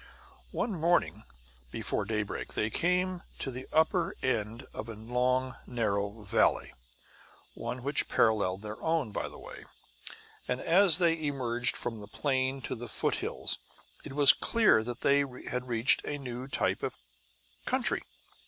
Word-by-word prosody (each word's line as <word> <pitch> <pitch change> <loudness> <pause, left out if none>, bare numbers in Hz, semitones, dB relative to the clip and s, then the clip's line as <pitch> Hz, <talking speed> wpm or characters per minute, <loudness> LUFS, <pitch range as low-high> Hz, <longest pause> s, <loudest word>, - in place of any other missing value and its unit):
One 235 - -2
morning 175 0 +1 0.4
before - - -2
daybreak 105 -2 -3
they 110 +1 0
came 180 +1 +1 0.2
to 135 - -4
the 130 +1 -7
upper 165 +2 +2
end 115 0 -1
of 110 +2 -6
a 115 - -6
long, 125 +3 0
narrow 105 -2 -2
valley 95 - +1 0.8
one 120 +1 -5
which 140 +2 +1
paralleled 105 -4 +2
their 105 0 -7
own, 160 -8 0
by - - -3
the - - -12
way - - -11 0.8
and 125 - -1
as 180 0 +5
they 165 -3 +2
emerged 120 -4 0
from 115 -2 -4
the 105 - -10
plain 130 +3 0
into 135 - -4
the 120 0 -6
foothills - - -1 0.4
it - - -8
was 145 0 +9
clear 220 - +4
that 120 +1 -6
they 140 0 +4
had 125 -2 -4
reached 115 +1 +3
a 145 - -3
new 125 -2 -6
type - - 0
of - - -4 0.7
country. - - 0
125 Hz, 145 wpm, -30 LUFS, 115-145 Hz, 0.8 s, was